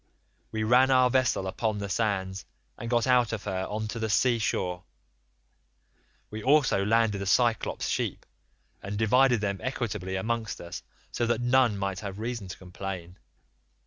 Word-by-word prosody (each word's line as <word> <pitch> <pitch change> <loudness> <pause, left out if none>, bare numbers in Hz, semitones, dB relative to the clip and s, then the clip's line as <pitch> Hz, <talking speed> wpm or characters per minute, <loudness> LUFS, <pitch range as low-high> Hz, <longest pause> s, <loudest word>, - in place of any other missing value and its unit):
We 110 0 -2
ran 125 +4 +5
our 130 -1 +4
vessel 130 -7 +2
upon 110 +3 -2
the 100 -1 -4
sands 95 -2 -1 0.3
and 115 - -6
got 120 -1 +2
out 125 -3 +3
of 110 - -4
her 95 -2 -2
on 110 +1 -3
to 115 - -5
the 110 -1 -2
sea 120 +4 +3
shore; 90 -4 -1 1.5
we 110 0 -5
also 135 -6 +3
landed 110 -1 +2
the 100 - -4
Cyclops' 115 +1 +1
sheep, - - -2 0.6
and 100 +1 -5
divided 120 +2 +4
them 100 -2 -1
equitably 105 -8 -3
amongst 115 +3 -2
us 85 - -7 0.3
so 120 - -1
that 120 -1 +1
none 125 -3 +3
might 100 -1 -2
have 100 -2 -6
reason 115 -2 -4
to 90 - -8
complain. 90 -1 -7
110 Hz, 160 wpm, -28 LUFS, 95-120 Hz, 1.5 s, ran